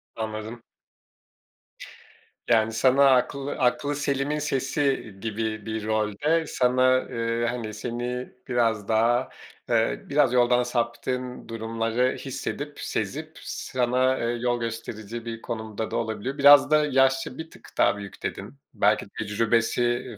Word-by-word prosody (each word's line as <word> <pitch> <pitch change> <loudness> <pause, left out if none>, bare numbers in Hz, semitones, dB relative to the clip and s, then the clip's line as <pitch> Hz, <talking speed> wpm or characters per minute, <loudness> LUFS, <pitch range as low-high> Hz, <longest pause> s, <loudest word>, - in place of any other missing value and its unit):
Anladım. 110 +1 -5 1.8
Yani, 110 -1 +3
sana 135 +4 +5
aklı 135 +2 +1
aklıselimin 145 +2 0
sesi 135 -5 -1
gibi 110 -1 -3
bir 110 -1 -4
rolde 110 +10 +1
sana, 130 +1 +3
eee, 115 0 -1
hani, 115 -3 -4
seni 120 +3 -4 0.2
biraz 115 -4 +1
daha, 120 +3 +2 0.4
eee, 115 -1 +1
biraz 140 -3 +3
yoldan 125 0 +4
saptığın 125 +1 -3
durumları 115 +2 -1
hissedip, 145 +2 -5
sezip 155 +10 -4
sana 130 +1 0
yol 120 +1 -1
gösterici 115 0 -6
bir 115 -1 -6
konumda 110 -1 -5
da - - -3
olabiliyor. 115 +4 -3
Biraz 145 +1 +7
da 150 0 +5
yaşça 135 -1 +2
bir 160 0 -7
tık - - -16
daha 100 - +3
büyük, 100 -2 -10
dedin. - - -5 0.2
Belki 105 +1 +2
tecrübesi, 115 +3 +1
eee, 120 -2 -1
120 Hz, 120 wpm, -25 LUFS, 110-130 Hz, 1.8 s, Biraz